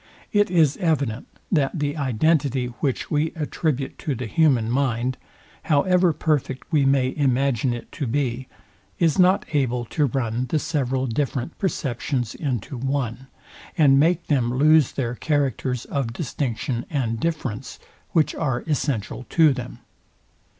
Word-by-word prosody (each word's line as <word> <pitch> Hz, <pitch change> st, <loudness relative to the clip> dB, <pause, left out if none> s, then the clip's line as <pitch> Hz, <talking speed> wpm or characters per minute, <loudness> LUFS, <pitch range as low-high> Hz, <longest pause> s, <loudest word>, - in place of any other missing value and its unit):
It 205 Hz, -1 st, +3 dB
is 160 Hz, -5 st, +3 dB
evident, 140 Hz, -, -1 dB, 0.2 s
that 150 Hz, -2 st, +1 dB
the 145 Hz, -1 st, -1 dB
identity, 135 Hz, -2 st, +1 dB
which 135 Hz, -4 st, -2 dB
we 155 Hz, +1 st, +1 dB
attribute 150 Hz, -3 st, -2 dB
to 145 Hz, -, -2 dB
the 125 Hz, +1 st, -4 dB
human 135 Hz, -4 st, +3 dB
mind, 125 Hz, 0 st, 0 dB, 0.5 s
however 180 Hz, +4 st, +3 dB
perfect 150 Hz, -4 st, -2 dB
we 145 Hz, -4 st, +3 dB
may 135 Hz, -1 st, +2 dB
imagine 135 Hz, -3 st, +1 dB
it 120 Hz, -1 st, -6 dB
to 140 Hz, -, -4 dB
be, 130 Hz, 0 st, -1 dB, 0.5 s
is 165 Hz, 0 st, +2 dB
not 185 Hz, +2 st, +4 dB
able 125 Hz, -4 st, 0 dB
to 145 Hz, +4 st, 0 dB
run 120 Hz, -1 st, -2 dB
the 155 Hz, -, +1 dB
several 135 Hz, -4 st, -1 dB
different 130 Hz, +3 st, -2 dB
perceptions 130 Hz, -, -2 dB
into 130 Hz, -3 st, -3 dB
one, 130 Hz, -1 st, -2 dB, 0.5 s
and 140 Hz, -4 st, +6 dB
make 170 Hz, +3 st, +2 dB
them 125 Hz, -5 st, +1 dB
lose 150 Hz, +2 st, +4 dB
their 120 Hz, -3 st, -2 dB
characters 130 Hz, -3 st, -1 dB
of 130 Hz, -5 st, -2 dB
distinction 120 Hz, -3 st, -3 dB
and 115 Hz, -6 st, -1 dB
difference, 140 Hz, -8 st, -3 dB, 0.3 s
which 160 Hz, -3 st, +2 dB
are 130 Hz, -6 st, -1 dB
essential 135 Hz, -6 st, -2 dB
to 160 Hz, -4 st, +5 dB
them. 125 Hz, -1 st, -7 dB
135 Hz, 135 wpm, -23 LUFS, 125-155 Hz, 0.5 s, and